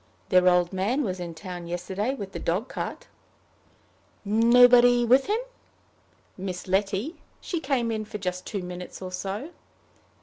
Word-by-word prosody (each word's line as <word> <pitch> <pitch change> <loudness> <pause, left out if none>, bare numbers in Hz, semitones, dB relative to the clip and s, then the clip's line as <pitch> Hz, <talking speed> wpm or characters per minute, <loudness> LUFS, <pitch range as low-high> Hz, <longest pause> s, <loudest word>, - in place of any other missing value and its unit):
"Their 180 -1 +5
old 180 0 +2
man 215 +10 0
was 185 -5 -3
in 170 -1 -5
the 160 - -14
town 175 -1 -7
yesterday 190 +8 -2
with 200 -7 -7
the - - -6
dog 190 +9 -1
cart." - - -5 1.2
"Nobody 240 +3 +6
with 255 +3 +4
him?" 425 - +1 1.0
"Miss 185 0 -6
Letty. 200 - 0 0.2
She 345 - -3
came 265 -6 0
in 215 -1 -3
for 210 - -6
just 180 -2 -4
two 200 -3 -4
minutes 180 0 -7
or 185 -1 -7
so." 195 - -5
200 Hz, 155 wpm, -26 LUFS, 180-245 Hz, 1.2 s, Nobody